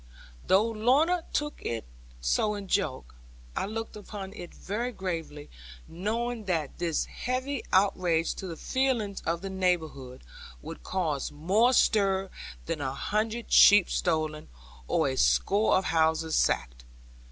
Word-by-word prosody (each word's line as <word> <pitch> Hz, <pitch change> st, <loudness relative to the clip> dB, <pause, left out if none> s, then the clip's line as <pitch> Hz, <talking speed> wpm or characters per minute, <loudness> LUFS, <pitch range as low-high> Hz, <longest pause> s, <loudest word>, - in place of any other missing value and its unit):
Though 195 Hz, +3 st, +5 dB
Lorna 265 Hz, +11 st, +2 dB
took 295 Hz, 0 st, -2 dB
it 115 Hz, -1 st, -3 dB, 0.3 s
so 135 Hz, -, +1 dB
in 200 Hz, -1 st, -7 dB
joke, 170 Hz, -, -1 dB, 0.4 s
I -, -, -1 dB
looked 225 Hz, +1 st, -5 dB
upon 200 Hz, -2 st, -8 dB
it 175 Hz, -4 st, -9 dB
very 235 Hz, +5 st, -4 dB
gravely, 165 Hz, -8 st, -5 dB, 0.4 s
knowing 220 Hz, +6 st, -3 dB
that 165 Hz, -7 st, -2 dB
this 170 Hz, -2 st, 0 dB
heavy 255 Hz, +2 st, -3 dB
outrage 180 Hz, -4 st, +2 dB
to 190 Hz, -, -5 dB
the 165 Hz, -2 st, -6 dB
feelings 245 Hz, -, -1 dB
of 170 Hz, +1 st, 0 dB
the 195 Hz, -, -4 dB
neighbourhood 160 Hz, -, -2 dB, 0.4 s
would -, -, -9 dB
cause 160 Hz, -7 st, -2 dB
more 195 Hz, +11 st, +2 dB
stir 195 Hz, -6 st, +2 dB, 0.3 s
than 165 Hz, -2 st, -3 dB
a 135 Hz, -1 st, -3 dB
hundred 220 Hz, +8 st, -2 dB
sheep 205 Hz, -3 st, +7 dB
stolen, 155 Hz, -, -1 dB, 0.4 s
or -, -, +2 dB
a 130 Hz, -, -1 dB
score 205 Hz, +9 st, +3 dB
of 190 Hz, -, -1 dB
houses 160 Hz, 0 st, +1 dB
sacked. -, -, 0 dB
190 Hz, 135 wpm, -28 LUFS, 160-220 Hz, 0.4 s, sheep